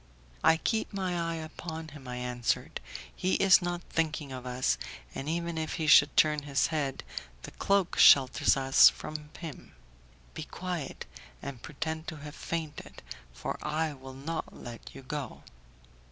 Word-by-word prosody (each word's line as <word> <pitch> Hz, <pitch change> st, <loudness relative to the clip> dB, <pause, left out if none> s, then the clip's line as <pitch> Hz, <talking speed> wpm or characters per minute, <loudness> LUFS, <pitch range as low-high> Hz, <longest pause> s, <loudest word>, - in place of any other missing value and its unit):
"I 160 Hz, -, +6 dB
keep 220 Hz, +6 st, -1 dB
my 190 Hz, -3 st, -2 dB
eye 165 Hz, -1 st, -1 dB
upon 160 Hz, 0 st, -6 dB
him," 145 Hz, -3 st, -12 dB
I 125 Hz, -, -4 dB
answered, 125 Hz, -1 st, -2 dB, 0.3 s
"he 185 Hz, -, +1 dB
is 195 Hz, -1 st, +6 dB
not 175 Hz, 0 st, -3 dB
thinking 155 Hz, -3 st, -2 dB
of 130 Hz, -1 st, -6 dB
us, 125 Hz, -, 0 dB, 0.3 s
and 140 Hz, -, -4 dB
even 170 Hz, 0 st, -2 dB
if 160 Hz, -, -3 dB
he 160 Hz, -, -2 dB
should 145 Hz, -1 st, +6 dB
turn 150 Hz, -1 st, +4 dB
his 140 Hz, -2 st, +1 dB
head, 140 Hz, -4 st, -1 dB, 0.4 s
the -, -, -8 dB
cloak 195 Hz, -2 st, +1 dB
shelters 135 Hz, -1 st, +7 dB
us 135 Hz, 0 st, +7 dB
from 150 Hz, -1 st, -7 dB
him. 165 Hz, -5 st, -9 dB, 0.6 s
Be -, -, -6 dB
quiet, 175 Hz, -6 st, -5 dB, 0.4 s
and 135 Hz, -4 st, -6 dB
pretend 160 Hz, +1 st, -4 dB
to 160 Hz, -, -4 dB
have 150 Hz, 0 st, -9 dB
fainted, 160 Hz, -2 st, -5 dB, 0.3 s
for -, -, -5 dB
I 155 Hz, 0 st, -1 dB
will 130 Hz, -1 st, -11 dB
not 155 Hz, +4 st, -4 dB
let 120 Hz, +1 st, -9 dB
you 135 Hz, -, -10 dB
go." 135 Hz, -2 st, -5 dB
150 Hz, 155 wpm, -30 LUFS, 135-165 Hz, 0.6 s, shelters